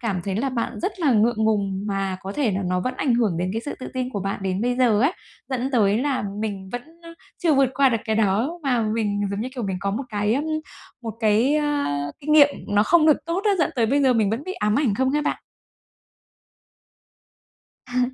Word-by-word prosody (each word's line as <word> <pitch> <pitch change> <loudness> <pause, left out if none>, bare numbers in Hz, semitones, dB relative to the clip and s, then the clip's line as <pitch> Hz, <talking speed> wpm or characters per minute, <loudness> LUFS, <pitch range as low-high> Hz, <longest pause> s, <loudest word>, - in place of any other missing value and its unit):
cảm 205 -7 -2
thấy 195 -1 -2
là 270 +4 0
bạn 240 -3 -3
rất 380 +1 -3
là 290 -6 +3
ngượng 220 0 +2
ngùng 200 -3 0
mà 195 -2 -2
có 195 - -5
thể 260 -1 0
là 195 0 -2
nó 180 0 0
vẫn 255 +6 -2
ảnh 255 -4 +1
hưởng 215 -8 +1
đến 180 +1 -1
cái 225 - -2
sự 290 - -4
tự - - -5
tin 255 0 -2
của 205 -6 -3
bạn 195 0 -3
đến 190 0 -1
bây 245 +2 0
giờ 235 -5 +3
ấy, 280 +8 +3 0.4
dẫn 260 0 -1
tới 210 -3 +3
là 275 -1 0 0.2
mình 200 -3 -4
vẫn, 245 - -3 0.2
ơ, 335 - -11 0.3
chưa 330 -4 +2
vượt 270 -2 +3
qua 275 0 +4
được 230 -3 0
cái 220 -2 0
đó 225 - +1
mà 250 -4 +1
mình 215 -2 -1
giống 200 +1 -3
như, 250 - -3
kiểu, 245 - -4
mình 190 -2 -2
có 200 - -1
một 245 +7 -3
cái, 210 +1 0
ờm, 285 - -1 0.6
một 225 -2 -5
cái, 225 +6 +3
ơ, 300 - +1 0.5
kinh 300 +2 -1
nghiệm 295 -2 +8 0.2
nó 205 0 +3
không 320 +6 +4
được 305 - +6
tốt 340 +4 -2
á, 420 - +4
dẫn 315 - +2
tới 230 -2 +3
bây 280 +4 +2
giờ 260 -2 +4
mình 215 -4 +2
vẫn 235 +6 -3
bị 370 - -4
ám 210 - 0
ảnh 260 -7 +2
không 260 +4 +1
ha 295 +2 0
bạn? - - -1 2.5
À. 250 +1 0
230 Hz, 240 wpm, -23 LUFS, 205-275 Hz, 2.5 s, nghiệm